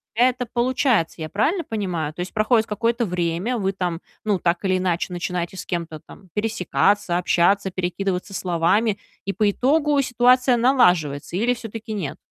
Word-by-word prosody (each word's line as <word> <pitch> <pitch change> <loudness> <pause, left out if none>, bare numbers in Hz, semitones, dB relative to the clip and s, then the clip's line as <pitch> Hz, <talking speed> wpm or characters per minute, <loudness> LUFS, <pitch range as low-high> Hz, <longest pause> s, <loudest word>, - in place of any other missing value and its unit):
это 250 +1 +2
получается. 240 - +1
Я 155 - -4
правильно 315 - 0
понимаю? 180 - -3
То 165 - -7
есть 180 - -6
проходит 220 +1 +2
какое-то 230 +3 0
время, 180 +5 -1
вы 195 -1 0
там, 180 -3 -3 0.3
ну, 205 -4 +1
так 175 +3 0
или 185 -1 +2
иначе, 180 0 -1
начинаете 175 +1 -3
с - - -6
кем-то 165 -3 -4
там 185 +4 -16
пересекаться, 205 -3 +1
общаться, 190 +3 +2
перекидываться 185 +1 -3
словами, 190 +5 +1 0.3
и 195 - -2
по 210 - +1
итогу 290 +4 +2
ситуация 250 0 +3
налаживается 180 - +2
или 240 +4 +2
всё-таки 225 -1 -7
нет? 190 -9 -4
195 Hz, 155 wpm, -22 LUFS, 175-235 Hz, 0.3 s, ситуация